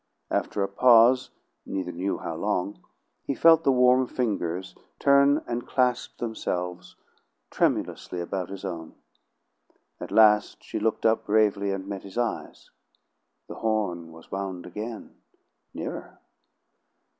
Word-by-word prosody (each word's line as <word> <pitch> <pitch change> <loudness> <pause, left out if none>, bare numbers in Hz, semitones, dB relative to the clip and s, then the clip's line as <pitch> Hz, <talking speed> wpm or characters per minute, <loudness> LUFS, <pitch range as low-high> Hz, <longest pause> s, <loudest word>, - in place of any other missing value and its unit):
After 100 - -1
a - - 0
pause, 120 +4 +5 0.3
neither 95 -2 -4
knew 95 +3 -2
how - - -5
long, 95 +3 -2 0.4
he 140 - -3
felt 165 +2 +6
the 135 - +4
warm 125 0 +4
fingers 95 -8 -2 0.2
turn 140 +1 +4
and 120 0 -4
clasp 125 -1 0
themselves 90 -6 -4 0.6
tremulously 90 - -1
about 90 +1 -4
his 100 0 -7
own. 85 -4 -6 1.0
At - - -7
last 105 -1 +4
she - - -4
looked 110 +1 -1
up 110 0 +2
bravely 105 -2 +2
and 95 -1 -4
met 100 -1 -5
his 100 +3 -11
eyes. 120 -2 -3 0.8
The - - -9
horn 100 -7 -1
was 80 0 -15
wound 95 -2 -4
again 110 +5 -7 0.5
nearer. - - -7
105 Hz, 125 wpm, -26 LUFS, 95-120 Hz, 1.0 s, felt